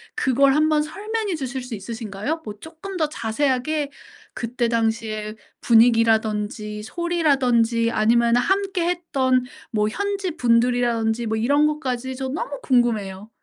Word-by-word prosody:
그걸 270 +1 +3
한번 305 0 +3
설명해 410 +5 -3
주실 265 -3 -4
수 250 -2 -6
있으신가요? 220 +7 -5
뭐 210 0 -7
쪼끔 335 +5 -9
더 320 -4 +1
자세하게 280 +4 -1 0.4
그때 240 0 -2
당시의 220 -2 -1 0.2
분위기라든지 220 -2 +2
소리라든지 250 -7 +1
아니면은 235 +2 +3
함께했던 340 -7 0 0.3
뭐 210 -1 +1
현지분들이라든지 245 - 0
뭐 220 0 -1
이런 285 +6 +3
것까지. 260 -4 -3
저 265 0 -4
너무 285 0 -4
궁금해요. 220 -6 0
245 Hz, 310 characters per minute, -22 LUFS, 225-305 Hz, 0.4 s, 그걸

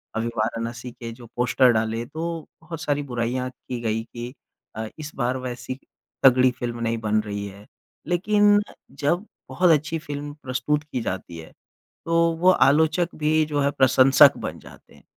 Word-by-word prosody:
अभी 115 +1 -1
वाराणसी 115 +2 -3
के 115 -1 -8
जो 120 +1 -12
पोस्टर 125 +1 +3
डाले, 110 +1 -1
तो 165 +3 -5
बहुत 165 0 -8
सारी 145 -1 -1
बुराइयाँ 125 0 -2
की 125 -1 -8
गई 110 -1 -1
कि 120 +2 -8 0.4
अ, 110 +1 -4
इस 155 0 -6
बार 125 0 0
वैसी 125 0 -5 0.5
तगड़ी 130 -1 +6
फ़िल्म 120 -1 -4
नहीं 115 0 0
बन 110 -1 +1
रही 100 -1 -5
है। 100 +1 -12 0.4
लेकिन 205 +4 +4 0.4
जब 170 +7 0 0.2
बहुत 175 +7 +2
अच्छी 155 +1 +1
फ़िल्म 145 -1 -6
प्रस्तुत 135 +3 -1
की 145 -5 -4
जाती 90 -4 -5
है, 80 -1 -11 0.5
तो 165 0 +3
वो 180 - +6
आलोचक 160 +2 +3
भी 155 0 +2
जो 145 -1 -1
है 140 0 +2
प्रशंसक 130 0 +6
बन - - -6
जाते - - -16
हैं। - - -20
130 Hz, 165 wpm, -24 LUFS, 115-155 Hz, 0.5 s, तगड़ी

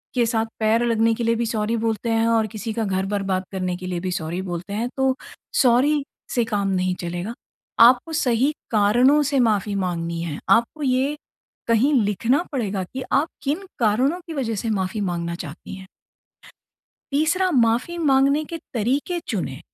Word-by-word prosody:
के 245 -2 +3
साथ 225 -1 0
पैर 220 +2 +2
लगने 230 -1 +2
के 235 - -3
लिए 230 0 +2
भी 235 +1 -1
सॉरी 225 0 -1
बोलते 225 0 -1
हैं 225 0 +2
और 225 -1 +2
किसी 215 +1 -5
का 225 - -1
घर 190 -1 -1
बर्बाद 195 -2 -1
करने 185 -2 -2
के 185 - -8
लिए 180 -1 -2
भी 185 +1 -3
सॉरी 175 +1 -3
बोलते 180 +1 -5
हैं 230 +4 -1
तो 265 -1 +2 0.5
सॉरी 275 +4 +3 0.3
से 240 - +3
काम 205 -3 -1
नहीं 185 -1 0
चलेगा। 175 +5 -4 0.5
आपको 250 +7 +6
सही 260 -2 +2 0.2
कारणों 240 +7 +4
से 280 -1 +1
माफ़ी 210 -4 +1
माँगनी 170 -3 -2
है। 155 -4 -4
आपको 235 +7 +2
ये, 265 +2 +1 0.5
कहीं 235 +6 +3
लिखना 230 - +1
पड़ेगा 210 -8 -2
कि 260 0 -4
आप 295 +3 +3 0.2
किन 305 +8 -2
कारणों 250 +9 +2
की 330 - -5
वजह 245 -7 -2
से 225 +3 -3
माफ़ी 195 +1 -2
माँगना 170 -3 -2
चाहती 160 +1 -8
हैं। 190 0 -11 1.2
तीसरा 330 +6 +2
माफ़ी 245 +4 +2
माँगने 280 -1 +3
के 330 +2 -6 0.2
तरीके 270 - 0
चुनें। 160 - -3
225 Hz, 175 wpm, -22 LUFS, 195-265 Hz, 1.2 s, आपको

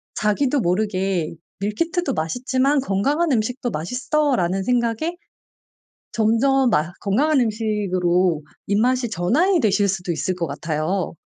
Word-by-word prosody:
자기도 250 +6 +1
모르게 185 -3 0 0.3
'밀키트도 290 - -1
맛있지만 255 - 0
건강한 275 - 0
음식도 245 +2 -1
맛있어.'라는 235 - 0
생각에 245 - 0 1.0
점점 245 +4 +3
맛 155 -4 0
건강한 270 +8 +2
음식으로 185 -7 0 0.2
입맛이 240 +4 +1
전환이 290 - +2
되실 205 -4 +2
수도 185 -2 -2
있을 165 +4 -2
것 170 -2 -2
같아요. 155 +6 -2
215 Hz, 285 characters per minute, -22 LUFS, 185-260 Hz, 1.0 s, 점점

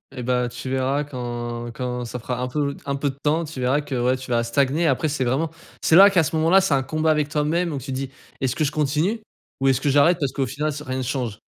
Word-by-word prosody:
Eh 125 - -5
bah, 125 0 +1
tu 125 +2 -7
verras 135 +2 0
quand 120 -3 -5
quand 125 0 -3
ça 120 +1 -5
fera 125 +1 -4
un 125 - -1
peu 140 +1 -1
d - - -16
un 140 0 -1
peu 140 0 -1
de 135 - -7
temps, 155 +3 +1
tu 150 -4 -8
verras 130 +4 +2
que, 140 -2 -5
ouais, 125 +1 +2
tu 130 -1 -8
vas 120 - +3
stagner. 140 +7 +1
Après, 150 +3 +1
c'est 135 -3 -1
vraiment 145 +6 0 0.3
c'est 160 - +5
là 200 +2 +10
qu'à 180 -4 +3
ce 150 - -3
moment 160 +1 +2
là, 190 +2 +6
c'est 190 -7 +1
un 135 - +3
combat 155 +4 0
avec 150 -2 +1
toi 150 0 0
même. 170 +4 0
Donc, 140 -3 -4
tu 135 - -6
dis: 130 0 -3 0.3
«Est-ce 130 -1 -1
que 155 - 0
je 145 - 0
continue, 155 +9 0 0.4
ou 135 - +1
est-ce 135 0 +3
que 145 - +1
j'arrête? 145 +5 +5
Parce 140 -5 -1
qu'au 135 -2 -1
final, 150 +1 -2
ça 150 +1 -7
rien 130 0 -3
ne 130 - -2
change». 120 -4 -3
140 Hz, 285 wpm, -23 LUFS, 125-150 Hz, 0.4 s, là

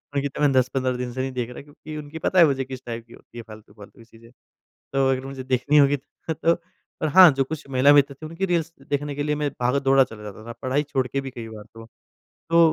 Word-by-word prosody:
उनकी 140 0 +1
तो 140 - -7
मैं 145 -1 +4
10-15 130 0 +1
दिन 125 0 -4
से 130 - -3
नहीं 135 0 -3
देख 125 -2 -3
रहा 125 - -9
क्योंकि 150 +1 -11
उनकी 150 +1 -8
पता 185 +3 +1
है 170 - +9
मुझे 135 -3 0
किस 130 -1 -8
टाइप 115 -1 -6
की 115 - -16
होती - - -16
है 120 - -6
फालतू-फालतू 105 -1 -14
की 115 - -15
चीज़ें। 115 0 -18 0.6
तो 135 -1 +2
अगर 130 0 -1
मुझे 135 -1 -7
देखनी 130 +3 +2
होगी 140 0 +5 0.3
तो 165 +1 +2 0.5
और 155 - +1
हाँ, 180 +3 +9
जो 135 0 0
कुछ 145 0 -7
महिला 135 +2 +5
मित्र 140 -1 +4
थे 155 +3 -10
उनकी 165 +5 -3
रील्स 170 -2 -1 0.2
देखने 145 0 -1
के 145 - -2
लिए 150 0 0
मैं 150 -1 -1
भागा-दौड़ा 135 +2 +3
चला 110 -3 -12
जाता 105 +1 -9
था, 115 - -6
पढाई 130 +3 +1
छोड़ 135 -3 -1
के 135 +3 -2
भी 135 -1 -7
कई 115 -3 -8
बार 110 -1 -10
तो। 115 0 -11 0.6
तो 165 0 +4
135 Hz, 250 wpm, -23 LUFS, 125-145 Hz, 0.6 s, है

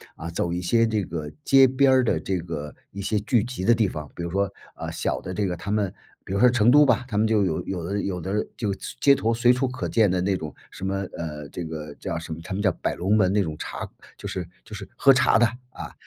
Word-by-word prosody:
啊， 85 - -6
走 85 0 -2
一 90 - -2
些 115 +6 +3
这 110 -3 0
个 80 -4 -5
街 135 -1 +6
边 130 +1 +3
儿 130 -1 +5
的 - - +2
这 95 -2 -2
个 80 -3 -6 0.2
一 100 - -6
些 105 +1 0
聚 110 +1 +1
集 120 -6 -5
的 120 0 +5
地 110 - +2
方。 75 -2 -7
比 85 - -5
如 85 - -4
说， 100 0 +1 0.3
啊， - - -5
小 - - -2
的 90 - -6
这 105 +1 0
个 90 - -1
他 100 - -7
们 105 -3 0 0.3
比 - - -9
如 100 - 0
说 125 - +7
成 120 -1 +4
都 150 +1 +7
吧， 130 - +2
他 105 - -2
们 110 +1 +3
就 110 -2 +3
有 80 -4 0
有 90 -3 -4
的 100 +4 -2
有 90 -3 -3
的 100 +4 -2
就 105 -4 -1 0.3
街 140 - +7
头 115 -3 +1
随 120 +2 +4
处 130 +1 +1
可 130 +1 -4
见 110 -4 +3
的 90 -1 +1
那 95 0 +1
种 75 - -7
什 95 - -7
么， 95 0 -1 0.2
呃， 75 -3 -6
这 85 - -6
个 75 -2 -6
叫 85 - -4
什 80 -1 -7
么， 80 - -7
他 - - -5
们 100 +2 -2
叫 95 - +4
百 - - -1
龙 100 +5 +2
门 95 -2 +3
那 105 -1 +3
种 80 -3 -4
茶 - - -5 0.3
就 - - -12
是 90 -2 -4 0.2
就 110 - -13
是 100 -1 -7
喝 135 - +6
茶 120 -2 +4
的， 120 - +5 0.3
啊， - - -8
100 Hz, 290 characters per minute, -25 LUFS, 85-115 Hz, 0.3 s, 说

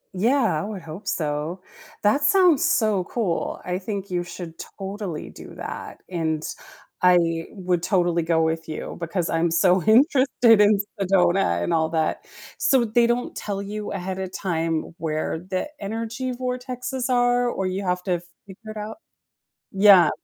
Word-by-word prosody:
Yeah, 230 +5 +2
I - - -4
would 200 -4 -6
hope 165 +5 -9
so. 155 +3 -2 0.4
That 210 +8 +3
sounds 345 0 +4
so 215 - +2
cool, 195 -7 -2
I 180 +1 -2
think 200 -1 -5
you 175 -1 0
should 170 -1 -9 0.2
totally 195 -4 -5
do - - -12
that, - - -7
and 160 -3 -2 0.6
I 170 -2 +3
would 180 -3 -1
totally 175 -2 +1
go 165 0 +2
with 160 0 -2
you 155 - -5
because 170 +1 -2
I'm 165 +1 +1
so 180 +2 +3
interested 245 - +5
in 210 0 +5 0.2
Sedona 180 - +2
and 170 - 0
all 160 -1 +2
that. 160 -1 -1 0.3
So, 260 -3 +3
they 235 +2 +3
don't 240 +1 -1
tell 200 -1 -4
you 210 +1 -5
ahead 190 0 -4
of 190 -1 -4
time 165 -3 -2
where 155 0 -2
the 185 - -3
energy 230 +5 -3
vortexes 250 0 -4
are 245 0 +3
or 195 - -2
you 185 +2 -2
have 180 -1 -1
to 180 -3 0 0.3
figure 215 +3 -11
it - - -10
out? 215 +6 -6 0.8
Yeah. 195 -4 +7
190 Hz, 155 wpm, -24 LUFS, 170-225 Hz, 0.8 s, Yeah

